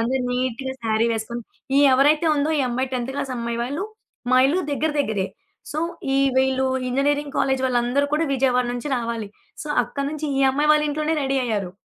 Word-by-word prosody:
అంటే 250 Hz, +4 st, 0 dB
నీట్‌గాశారీ 250 Hz, -2 st, -1 dB
వేసుకొని 235 Hz, +2 st, -4 dB, 0.4 s
ఈ -, -, +6 dB
ఎవరైతే 295 Hz, +5 st, +4 dB
ఉందో, 295 Hz, +2 st, +1 dB
ఈ -, -, +2 dB
అమ్మాయి 255 Hz, +2 st, -2 dB
10థ్ 255 Hz, +1 st, -2 dB
క్లాసమ్బాయి 235 Hz, -4 st, -3 dB
వాళ్ళు, 285 Hz, +10 st, -3 dB, 0.5 s
మా 255 Hz, -, +6 dB
ఇల్లు 365 Hz, +5 st, +1 dB
దెగ్గర, 310 Hz, +2 st, 0 dB
దెగ్గరే. 210 Hz, -8 st, -1 dB, 0.5 s
సో, 310 Hz, -, -2 dB, 0.4 s
ఈ -, -, +3 dB, 0.2 s
వీళ్ళు 265 Hz, 0 st, +2 dB, 0.2 s
ఇంజినీరింగ్ 285 Hz, +2 st, 0 dB
కాలేజు 265 Hz, -1 st, +1 dB
వాళ్ళందరూ 250 Hz, +3 st, +1 dB
కూడా, 320 Hz, +2 st, +1 dB
విజయవాడ 250 Hz, -1 st, +2 dB
నుంచి 245 Hz, +4 st, -4 dB
రావాలి. 230 Hz, -3 st, -3 dB, 0.4 s
సో, -, -, -7 dB, 0.2 s
అక్కడ 280 Hz, +3 st, -4 dB
నుంచి 305 Hz, 0 st, -4 dB
ఈ -, -, +3 dB
అమ్మాయి 295 Hz, +3 st, +2 dB
వాళ్ళ 300 Hz, 0 st, +2 dB
ఇంట్లోనే 305 Hz, +2 st, -1 dB
రెడీ 270 Hz, 0 st, +1 dB
అయ్యారు. 205 Hz, -6 st, -2 dB
265 Hz, 170 wpm, -23 LUFS, 240-290 Hz, 0.5 s, ఈ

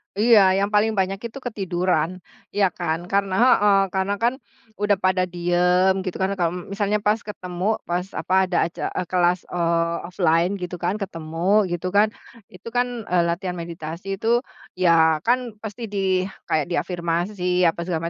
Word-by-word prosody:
Iya, 220 Hz, +1 st, +6 dB, 0.2 s
yang 200 Hz, +1 st, +1 dB
paling 215 Hz, +2 st, +3 dB
banyak 190 Hz, +1 st, 0 dB
itu 235 Hz, -, -12 dB
ketiduran, 185 Hz, -5 st, -1 dB, 0.3 s
ya 200 Hz, -2 st, +4 dB
kan, 165 Hz, -2 st, -1 dB
kan 200 Hz, 0 st, +3 dB
heeh, 205 Hz, -1 st, +4 dB
karena 190 Hz, +1 st, 0 dB
kan 240 Hz, -, +3 dB, 0.5 s
udah 205 Hz, -1 st, +3 dB
pada 185 Hz, 0 st, +3 dB
diem 180 Hz, +2 st, +2 dB
gitu 185 Hz, -, -4 dB
kan, 190 Hz, +1 st, +1 dB
kalau 170 Hz, -1 st, +1 dB, 0.2 s
misalnya 205 Hz, +1 st, 0 dB
pas 210 Hz, +2 st, +2 dB
ketemu 180 Hz, -3 st, -6 dB, 0.2 s
pas 175 Hz, +1 st, -1 dB
apa -, -, -2 dB, 0.2 s
ada 180 Hz, -, 0 dB
aca 170 Hz, -, -7 dB
eee, 180 Hz, -, -1 dB
kelas, 180 Hz, 0 st, +3 dB
eee, 170 Hz, -1 st, 0 dB
offline 175 Hz, 0 st, +2 dB
gitu 180 Hz, 0 st, -4 dB
kan, 185 Hz, +4 st, +1 dB
ketemu 180 Hz, +3 st, 0 dB
gitu 175 Hz, +1 st, -3 dB
kan, 205 Hz, +2 st, +5 dB, 0.5 s
itu 185 Hz, +5 st, -13 dB
kan, 245 Hz, 0 st, +2 dB, 0.2 s
eee, 175 Hz, -1 st, +4 dB
latihan 180 Hz, +1 st, -2 dB
meditasi 165 Hz, +1 st, -7 dB
itu 235 Hz, +3 st, +2 dB, 0.4 s
ya 160 Hz, -3 st, +4 dB
kan 245 Hz, -1 st, +1 dB
pasti 220 Hz, +2 st, -7 dB
di 190 Hz, -2 st, +1 dB, 0.3 s
kayak 155 Hz, -2 st, +1 dB
di -, -, +1 dB
afirmasi 175 Hz, +2 st, -3 dB, 0.3 s
apa 165 Hz, -, -6 dB
segala 170 Hz, -1 st, -2 dB
185 Hz, 165 wpm, -23 LUFS, 170-200 Hz, 0.5 s, Iya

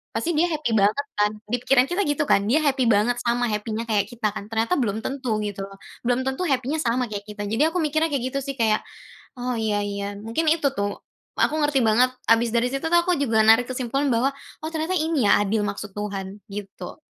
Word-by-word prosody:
pasti 345 Hz, -, 0 dB
dia 340 Hz, +3 st, +3 dB
happy 300 Hz, -7 st, -1 dB
banget 215 Hz, +7 st, +2 dB
kan," 210 Hz, 0 st, +3 dB, 0.2 s
di 245 Hz, -, +2 dB
pikiran 255 Hz, 0 st, +5 dB
kita 360 Hz, +3 st, +1 dB
gitu 290 Hz, 0 st, +1 dB
kan? 200 Hz, -, +4 dB
Dia 300 Hz, +6 st, +4 dB
happy 270 Hz, -3 st, +2 dB
banget 225 Hz, +3 st, +3 dB
sama 240 Hz, +1 st, +1 dB
happy-nya 215 Hz, +2 st, -2 dB
kayak 205 Hz, -3 st, +2 dB
kita 230 Hz, -3 st, -1 dB
kan? 200 Hz, -, -6 dB
Ternyata 225 Hz, +9 st, +1 dB
belum 220 Hz, -4 st, 0 dB
tentu, 260 Hz, -5 st, -2 dB
gitu 200 Hz, -1 st, -4 dB
loh. 195 Hz, 0 st, -14 dB, 0.3 s
Belum 245 Hz, +2 st, +1 dB
tentu 265 Hz, +7 st, -2 dB
happy-nya 270 Hz, +3 st, 0 dB
sama 245 Hz, +2 st, +1 dB
kayak 205 Hz, -1 st, -4 dB
kita, 210 Hz, 0 st, -6 dB
jadi 285 Hz, +10 st, +2 dB
aku -, -, +2 dB
mikirnya 310 Hz, +2 st, +1 dB
kayak 270 Hz, -4 st, -1 dB
gitu 275 Hz, -, -1 dB
sih, 275 Hz, 0 st, -5 dB
kayak 220 Hz, -2 st, +3 dB, 0.6 s
"Oh, 250 Hz, 0 st, -2 dB
iya 215 Hz, -2 st, 0 dB
iya," 200 Hz, 0 st, -4 dB
mungkin 230 Hz, +10 st, -2 dB
itu 320 Hz, -3 st, +2 dB
tuh. 200 Hz, -2 st, -2 dB, 0.4 s
Aku -, -, +2 dB
ngerti 290 Hz, -2 st, +2 dB
banget, 230 Hz, +4 st, +4 dB, 0.2 s
abis 230 Hz, +1 st, +4 dB
dari 235 Hz, +1 st, +3 dB
situ 275 Hz, +3 st, -3 dB
tuh 345 Hz, -, +6 dB
aku 360 Hz, 0 st, +1 dB
juga 230 Hz, -6 st, +2 dB
narik 225 Hz, +3 st, +6 dB
kesimpulan 255 Hz, +2 st, -1 dB
bahwa 240 Hz, +4 st, +2 dB, 0.3 s
"Oh, 315 Hz, -, -2 dB
ternyata 320 Hz, +4 st, -1 dB
ini 310 Hz, -6 st, +1 dB
ya, 200 Hz, -, +5 dB
adil, 210 Hz, +1 st, 0 dB
maksud 205 Hz, 0 st, -5 dB
Tuhan," 200 Hz, -1 st, -5 dB
gitu. 200 Hz, -1 st, -8 dB
240 Hz, 215 wpm, -24 LUFS, 210-280 Hz, 0.6 s, tuh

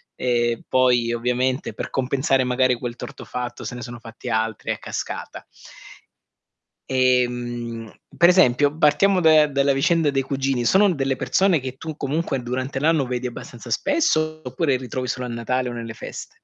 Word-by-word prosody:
Ehm, 120 Hz, -2 st, 0 dB
poi 125 Hz, -2 st, +3 dB
ovviamente 125 Hz, +3 st, -1 dB
per -, -, -5 dB
compensare, 135 Hz, 0 st, +1 dB
magari, 125 Hz, 0 st, +2 dB
quel 120 Hz, 0 st, -5 dB
torto -, -, -9 dB
fatto 125 Hz, -1 st, -5 dB
se -, -, -5 dB
ne 125 Hz, -, -7 dB
sono 120 Hz, -1 st, -7 dB
fatti 115 Hz, +2 st, -9 dB
altri 110 Hz, -1 st, -2 dB
a -, -, -2 dB
cascata. -, -, -6 dB, 1.4 s
Ehm, 120 Hz, -3 st, 0 dB, 0.3 s
per 175 Hz, -, +6 dB
esempio, 145 Hz, -4 st, +4 dB
partiamo 180 Hz, +5 st, +4 dB
da 155 Hz, -1 st, +6 dB
dalla 140 Hz, 0 st, +2 dB
vicenda 155 Hz, +2 st, +2 dB
dei 135 Hz, -1 st, 0 dB
cugini, 135 Hz, -2 st, -1 dB
sono 195 Hz, 0 st, +5 dB
delle 135 Hz, -2 st, -1 dB
persone 185 Hz, +2 st, +2 dB
che 130 Hz, 0 st, -6 dB
tu 160 Hz, -2 st, -6 dB
comunque 140 Hz, -1 st, -2 dB
durante 130 Hz, +2 st, -3 dB
l'anno 155 Hz, -3 st, +2 dB
vedi 125 Hz, 0 st, -3 dB
abbastanza 120 Hz, 0 st, -9 dB
spesso 155 Hz, -, +1 dB
oppure 130 Hz, +2 st, 0 dB
li 125 Hz, -, -7 dB
trovi 130 Hz, +2 st, -3 dB
solo 125 Hz, +1 st, -3 dB
a -, -, -6 dB
Natale 125 Hz, +2 st, -2 dB
o -, -, -6 dB
nelle 115 Hz, -1 st, -6 dB
feste? -, -, -8 dB
130 Hz, 165 wpm, -22 LUFS, 120-145 Hz, 1.4 s, per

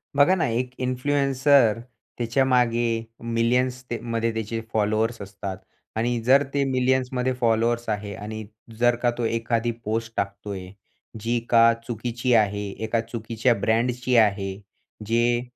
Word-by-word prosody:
बघा 145 Hz, +6 st, +5 dB
ना, 175 Hz, -, +1 dB
एक 125 Hz, +2 st, -2 dB
इन्फ्लुएन्सर 135 Hz, -2 st, +3 dB, 0.4 s
त्याच्यामागे 120 Hz, -2 st, +1 dB, 0.3 s
मिलियन्सते 125 Hz, +1 st, 0 dB, 0.2 s
मध्ये 115 Hz, 0 st, +1 dB
त्याचे 110 Hz, +1 st, -3 dB
फॉलोवर्स 110 Hz, +1 st, 0 dB
असतात 100 Hz, -1 st, -6 dB, 0.4 s
आणि 120 Hz, +2 st, 0 dB
जर 135 Hz, +4 st, +5 dB
ते 140 Hz, -, +2 dB
मिलियन्समध्ये 130 Hz, 0 st, +1 dB
फॉलोवर्स 115 Hz, 0 st, +1 dB
आहे 105 Hz, -1 st, -3 dB
आणि 110 Hz, +1 st, -6 dB, 0.3 s
जर 120 Hz, 0 st, +4 dB
का 120 Hz, -, +4 dB
तो 120 Hz, -, -1 dB
एखादी 115 Hz, +1 st, 0 dB
पोस्ट 115 Hz, +1 st, -2 dB
टाकतोय, 100 Hz, -1 st, -4 dB, 0.5 s
जी 115 Hz, +3 st, 0 dB
का 115 Hz, 0 st, +6 dB
चुकीची 120 Hz, +2 st, -1 dB
आहे 105 Hz, -2 st, +2 dB
एका 115 Hz, +1 st, 0 dB
चुकीच्या 115 Hz, +1 st, -1 dB
ब्रँडची 125 Hz, +4 st, +1 dB
आहे, 100 Hz, -3 st, +2 dB, 0.5 s
जे 120 Hz, +2 st, +2 dB
115 Hz, 125 wpm, -24 LUFS, 110-125 Hz, 0.5 s, का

